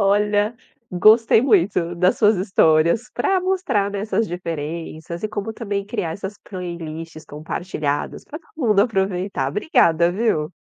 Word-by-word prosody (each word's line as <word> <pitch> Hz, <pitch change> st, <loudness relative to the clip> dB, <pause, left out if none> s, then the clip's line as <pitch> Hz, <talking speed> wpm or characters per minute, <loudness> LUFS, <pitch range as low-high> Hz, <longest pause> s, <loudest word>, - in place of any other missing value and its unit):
Olha, 205 Hz, +2 st, +2 dB, 0.3 s
gostei 220 Hz, +5 st, +5 dB
muito 180 Hz, -7 st, +2 dB
das 180 Hz, +2 st, +2 dB
suas 210 Hz, -1 st, +4 dB
histórias 180 Hz, +2 st, +2 dB
pra 375 Hz, +9 st, +1 dB
mostrar, 365 Hz, -, 0 dB
né, 200 Hz, -, -4 dB
essas 220 Hz, +2 st, 0 dB
diferenças 165 Hz, 0 st, -5 dB
e 215 Hz, -, -1 dB
como 215 Hz, +1 st, -4 dB
também 200 Hz, -3 st, -3 dB
criar 205 Hz, -6 st, -3 dB
essas 195 Hz, +2 st, -6 dB
playlists 165 Hz, -4 st, -7 dB
compartilhadas 150 Hz, -1 st, -4 dB
pra 305 Hz, -, -8 dB
todo 325 Hz, -, -30 dB, 0.2 s
mundo 210 Hz, -2 st, +4 dB
aproveitar. 190 Hz, -, -1 dB
Obrigada, 170 Hz, -, +2 dB
viu? 180 Hz, -7 st, 0 dB
195 Hz, 135 wpm, -21 LUFS, 170-215 Hz, 0.3 s, gostei